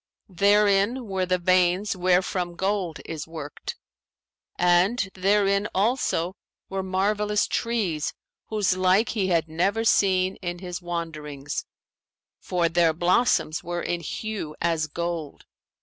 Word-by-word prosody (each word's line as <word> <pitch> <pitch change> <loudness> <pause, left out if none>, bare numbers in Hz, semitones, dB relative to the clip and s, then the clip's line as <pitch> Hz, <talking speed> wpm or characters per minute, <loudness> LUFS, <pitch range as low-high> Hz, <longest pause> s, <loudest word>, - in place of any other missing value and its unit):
Therein 205 +5 +3
were 190 -3 -2
the 185 0 +2
veins 185 +2 +2
wherefrom 180 -1 +1
gold 190 -4 -1
is 160 -1 -6
worked; 155 -3 -7 0.8
and 180 +5 +3
therein 200 +1 +2
also 195 -4 +1 0.3
were 195 0 -2
marvellous 205 +3 +1
trees 200 -11 -1 0.4
whose 210 -4 +1
like 185 +4 +3
he 200 -5 0
had 170 -3 +1
never 195 +8 0
seen 190 -3 +3
in 175 -1 -4
his 180 0 -6
wanderings, 155 -5 -5 0.7
for 175 -2 0
their 165 -1 +3
blossoms 175 -1 +2
were 175 0 -3
in 175 - -1
hue 170 -2 -5
as 165 -2 0
gold. 170 -1 -4
185 Hz, 120 wpm, -25 LUFS, 170-200 Hz, 0.8 s, Therein